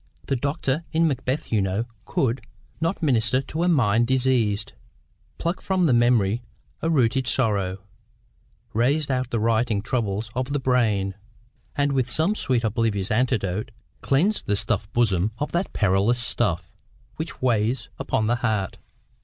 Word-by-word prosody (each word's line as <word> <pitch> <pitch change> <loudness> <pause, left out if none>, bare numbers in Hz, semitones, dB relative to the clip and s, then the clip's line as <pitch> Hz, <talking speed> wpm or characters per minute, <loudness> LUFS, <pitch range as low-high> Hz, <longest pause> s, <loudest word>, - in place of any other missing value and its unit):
The 135 - 0
doctor 140 +3 -1
in 165 0 +3
'Macbeth,' 130 0 -2
you 110 -3 +3
know, 95 +4 -1 0.2
could 130 0 0 0.4
'not 165 +3 -1
minister 125 -3 +2
to 145 +4 -4
a 175 - +2
mind 120 - +3
diseased, 120 -5 +1 0.6
Pluck 170 +2 -2
from 185 -2 +1
the 145 - +3
memory 120 -2 +3 0.4
a 165 - 0
rooted 130 -4 +2
sorrow, 105 -6 +1 1.0
Raze 140 +6 +1
out 130 -1 -1
the 115 - -1
written 110 -1 +1
troubles 110 -3 -2
of 130 +2 -2
the 145 - +1
brain, 110 -7 +1 0.6
And 145 0 +1
with 130 -3 0
some 160 +10 +1
sweet 130 - +1
oblivious 110 -3 0
antidote 110 -5 0 0.3
Cleanse 180 +11 +2
the 105 - -1
stuff'd 100 0 0
bosom 105 -3 +1
of 150 - -3
that 175 +2 -1
perilous 100 +4 +2
stuff 110 -8 +1 0.5
Which 160 -2 -5
weighs 115 -3 0
upon 110 - 0
the 120 +2 +1
heart. 110 -5 -1
120 Hz, 145 wpm, -24 LUFS, 105-135 Hz, 1.0 s, in